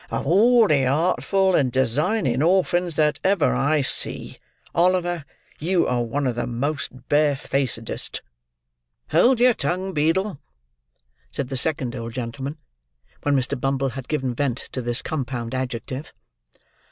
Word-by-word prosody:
of - - -3
all 225 - +5
the 140 -5 +3
artful 185 +7 +2
and 135 -7 +2
designing 130 - +1
orphans 175 0 +2
that 150 0 +2
ever 190 -5 +3
I 145 +2 +2
see, 130 - 0 0.4
Oliver, 175 -2 +1 0.3
you 175 +3 +1
are 125 -1 0
one 135 +5 -2
of 125 - +1
the 120 0 -2
most 130 0 -4
bare 145 -1 +3
facedest." 130 -5 -3 0.9
"Hold 250 -1 +4
your 250 0 +6
tongue, 185 +3 -2
Beadle," 165 +3 0 0.9
said 125 - -4
the 135 - -3
second 130 -2 -1
old 115 -1 -6
gentleman, 130 +4 -5 0.6
when 145 -1 +1
Mr. 130 0 -1
Bumble 135 0 0
had 130 0 -7
given 130 -5 -1
vent 125 -1 -1
to 130 - -3
this 120 0 -2
compound 125 -6 -4
adjective. 130 +2 -4
140 Hz, 140 wpm, -23 LUFS, 130-175 Hz, 0.9 s, your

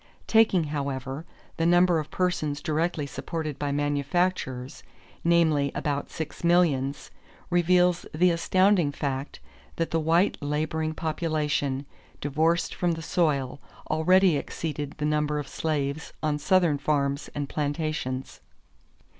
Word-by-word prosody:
Taking, 220 -6 +4
however, 140 -1 -4 0.3
the 165 - +1
number 175 -1 +4
of 155 - -5
persons 165 -5 -1
directly 155 0 -1
supported 155 0 -5
by 145 -1 -1
manufactures, 145 -1 -1 0.4
namely 160 -5 +3
about 145 -1 -2
six 160 +1 -6
millions, 155 -6 +2 0.4
reveals 180 0 +3
the 175 +3 +3
astounding 185 -1 +3
fact 140 -1 -4 0.4
that 165 - -2
the 165 - +2
white 165 +5 +2
laboring 155 +2 -1
population, 150 -4 -1 0.3
divorced 160 +4 +1
from 175 -1 0
the 165 0 -6
soil, 145 -6 0 0.3
already 180 +2 +4
exceeded 145 -1 -4
the 150 - -2
number 150 0 +1
of 145 - -4
slaves 150 -1 -2
on 150 -1 0
Southern 170 -3 +3
farms 140 -1 0
and 145 -1 -2
plantations. 145 - -3
155 Hz, 120 wpm, -26 LUFS, 145-170 Hz, 0.4 s, Taking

